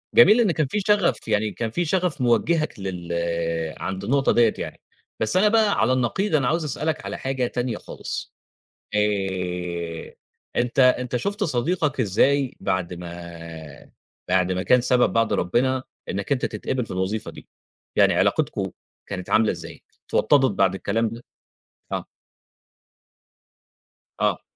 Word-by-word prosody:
جَميل 235 0 +8
إن 205 -6 +3
كان 155 -3 0
في 210 - -1
شغف 205 - +2
يعني 105 -1 +1
كان 115 -1 -3
في 175 +9 -1
شغف 175 -4 0
موجهَك 135 +4 +1
لل 90 -3 -5 0.6
عَند 95 0 -4
النقطة 135 +5 +2
ديّة 115 -2 +4
يعني، - - -6 0.4
بس 110 +11 +1
أنا 210 - +5
بقى 215 -1 +3
على 115 +4 +3
النقيض 155 - 0
أنا 135 -4 +2
عاوز 165 +4 +1
أسألَك 155 +3 -2
على - - -4
حاجة 130 -2 -1
تانية 120 -2 -2
خالص. - - -6 0.6
آآ 90 -5 -2 0.4
أنت 120 +2 0
أنت 125 -1 +3
شُفت 200 - -1
صديقَك 150 +1 0
إزاي 130 +5 +2
بَعد 90 -1 -1
ما 85 0 -8 1.0
بَعد 90 0 +2
ما 90 0 -1
كان 125 +2 +4
سبب 125 0 +3
بَعد 115 -2 +2
ربنا 130 +8 +1 0.3
إنَّك 100 +6 -4
أنت 130 - +1
تتقبل 125 -2 -2
في - - -9
الوظيفة؟ 95 +4 -2
دي - - -13 0.5
يعني - - +5
علاقتكم - - +1 0.4
كانت 90 -2 -6
عاملة 110 0 +4
إزاي؟ - - -9 0.2
اتوطدت 135 -5 +3
بَعد 95 -1 +2
الكلام 110 +4 0
ده؟ 115 +2 -9 0.7
آه. - - -2 2.2
آه. - - +1
120 Hz, 140 wpm, -24 LUFS, 95-145 Hz, 2.2 s, جَميل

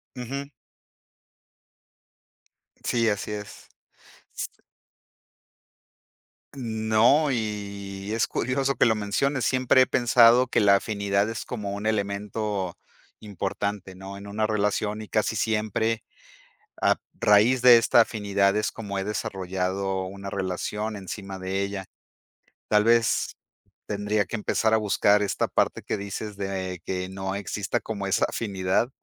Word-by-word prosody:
Ujú. 135 +3 -5 2.3
Sí, 115 -2 +2
así 105 0 -2
es. 105 0 -8 2.8
No, 115 +3 +2
y 100 -3 -4
es 115 - +2
curioso 135 +2 0
que - - +3
lo 110 - +3
menciones. 115 +5 0
Siempre 130 0 +4
he - - +6
pensado 120 0 +5
que - - +1
la 100 -1 +6
afinidad 100 0 0
es 115 -3 -5
como 105 -5 -4
un 100 +1 -6
elemento 100 -2 -2 0.4
importante, 100 -1 -4
¿no? 95 +1 -9
En 100 - -10
una 105 +2 -1
relación 105 0 -1
y - - -10
casi 110 +1 0
siempre 110 +1 0 0.8
a - - +4 0.2
raíz 110 +5 +4
de 125 -2 +9
esta 115 +1 +5
afinidad 100 -3 +1
es 105 - 0
como 100 -3 -5
he 95 - -2
desarrollado 95 -2 -2
una 100 +1 -7
relación 100 +3 -3
encima 95 0 -7
de 95 +1 -2
ella. 100 -1 -4 0.8
Tal 105 0 +4
vez, 115 -1 +2 0.5
tendría 105 0 0
que 110 +5 -5
empezar 110 +1 +1
a - - +6
buscar 105 -1 +3
esta 100 - 0
parte - - +1
que - - -2
dices 100 +1 -6
de 95 -2 -3
que 95 0 -3
no 95 0 -4
exista 100 0 -2
como 100 -3 -4
esa 95 - +1
afinidad. 95 +1 0
105 Hz, 125 wpm, -26 LUFS, 100-110 Hz, 2.8 s, de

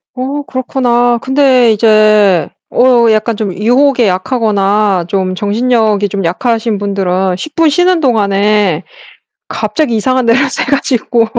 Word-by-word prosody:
어 270 +3 -4
그렇구나. 245 -2 0
근데 265 -3 +2
이제 215 -4 +3 0.2
어 245 -2 +3
약간 215 +1 0
좀 205 -3 -4
유혹에 245 +4 +1
약하거나 200 -2 0
좀 185 -1 -2
정신력이 215 0 0
좀 195 0 -4
약하신 225 +4 -1
분들은 190 -2 -1
10 305 +10 -9
분 330 -1 +3
쉬는 355 +4 +1
동안에 205 - 0 0.6
갑자기 300 -8 -2
이상한 255 +3 0
데로 230 +2 +3
새 - - -3
가지고 250 -4 0
225 Hz, 265 characters per minute, -11 LUFS, 200-255 Hz, 0.6 s, 이제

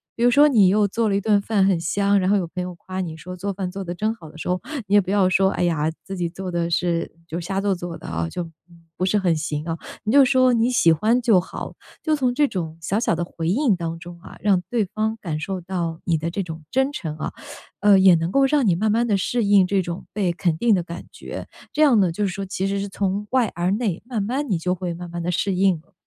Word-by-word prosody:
比 230 - -2
如 245 - +5
说 290 +3 +6
你 215 -10 +5
又 205 +1 +3
做 225 +2 0
了 200 - +1
一 - - +1
顿 205 0 +2
饭 200 -2 +2
很 195 -2 +3
香， 200 +4 +1
然 185 - +1
后 205 - +4
有 180 - -1
朋 180 +2 -4
友 180 0 -5
夸 185 +2 -6
你 165 -3 -5
说： 180 +3 -8
“做 200 +3 -3
饭 190 -1 -4
做 195 +2 -6
得 175 -1 -4
真 215 +5 -1
好” 165 -8 -12
的 - - -14
时 - - -6
候， 180 0 0 0.3
你 200 - +2
也 205 - +7
不 190 0 -4
要 200 -2 +4
说： 190 +1 +3
“哎 - - -1
呀， 160 -3 +1
自 195 - -6
己 175 -2 -2
做 185 +2 -6
得 170 -1 -1
是 170 0 0 0.2
就 170 - -5
瞎 195 +3 -2
做 200 -1 +1
做 175 -1 -6
的 - - -11
啊， 80 0 -2
就 170 - -5 0.5
不 185 - -1
是 190 +3 +2
很 180 -5 +2
行 150 -1 -3
啊。 165 -1 -2 0.3
“你 215 - +1
就 280 0 +8
说：” 255 -1 +4
你 230 +1 +2
喜 170 -10 +4
欢 225 +9 +2
就 230 -6 +4
好。 - - -7 0.3
“就 310 -1 +1
从 255 -4 0
这 290 +3 +3
种 165 - -4
小 185 +6 -1
小 230 - +1
的 170 +1 -1
回 165 -1 -4
应 235 0 +2
当 165 -1 -4
中 175 0 -10
啊， - - -12
让 195 -4 +2
对 230 -4 +1
方 215 +4 -2
感 160 -6 -3
受 190 +2 -3
到 170 -2 -3
你 165 -2 +2
的 165 +2 -3
这 195 - -2
种 160 -3 -7
真 265 +2 +1
诚 155 - -5
啊， 155 - -4 0.5
呃， 200 -2 +6
也 190 -2 +7
能 165 +2 -1
够 275 +3 +4
让 280 -1 +2
你 190 - +4
慢 215 +5 0
慢 230 +3 +2
地 210 -4 +2
适 235 +5 0
应 200 -2 +5
这 195 0 +1
种 170 0 -6
被 195 -4 0
肯 170 -2 -1
定 235 +4 +3
的 185 - +2
感 170 +1 -8
觉， - - -8 0.3
这 305 - 0
样 265 -8 +6
呢， 185 - +3
就 210 - -2
是 190 - -2
说 195 +1 -4
其 190 0 -3
实 200 0 -1
是 200 - -3
从 200 +1 -2
外 255 -5 +2
而 175 +2 0
内， 205 -4 -1
慢 235 -5 -2
慢 260 +5 -2
你 185 - +1
就 180 +2 -1
会 180 -1 -4
慢 175 +1 -8
慢 170 0 -4
地 170 - -2
适 190 +3 0
应 190 +1 +4
了。 170 - -33
190 Hz, 295 characters per minute, -22 LUFS, 175-210 Hz, 0.5 s, 就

